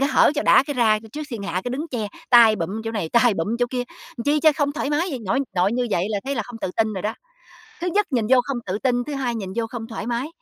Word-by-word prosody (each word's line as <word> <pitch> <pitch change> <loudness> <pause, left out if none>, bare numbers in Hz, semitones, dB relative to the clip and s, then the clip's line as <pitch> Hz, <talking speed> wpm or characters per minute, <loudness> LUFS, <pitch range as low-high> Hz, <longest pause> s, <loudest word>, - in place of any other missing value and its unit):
cái 275 - +2
hở - - +5
cho 295 - +1
đã - - +6
cái 290 - -3
ra 220 -3 +3
c 220 0 -15
trước 305 - -5
thiên 225 -4 -5
hạ 190 - -4
cái 245 - -2
đứng 295 +6 -4
che, 225 -6 -3 0.2
tay 230 -3 +7
bụm 195 +6 -3
chỗ 225 - -2
này, 200 -7 -2
tay 235 0 +4
bụm 205 +8 -1
chỗ 245 - +2
kia, 250 -1 -1 0.3
làm 235 - -5
chi 295 +1 +2
cho 310 -2 +6
không 285 -2 +1
thoải 295 -1 -3
mái 315 +5 +1
vậy? 265 - -3
Nội 240 +8 +1 0.2
nội 185 +4 +2
như 245 0 0
vậy 175 +1 +1
là 205 - 0
thấy 275 +1 -2
là - - -1
không 240 -2 -10
tự 185 - -3
tin 220 -1 +1
rồi 190 - -5
đó. 215 +2 -2 0.7
Thứ 360 - -1
nhất 410 +3 +1
nhìn 235 -4 +1
vô 260 -1 +6
không 275 -1 -3
tự 190 +2 -2
tin, 245 -2 +1
thứ 295 - -6
hai 260 -4 -2
nhìn 195 -4 -4
vô 230 -1 -1
không 225 -1 -6
thoải 225 -1 -6
mái, 240 +4 -1
240 Hz, 310 wpm, -23 LUFS, 215-275 Hz, 0.7 s, tay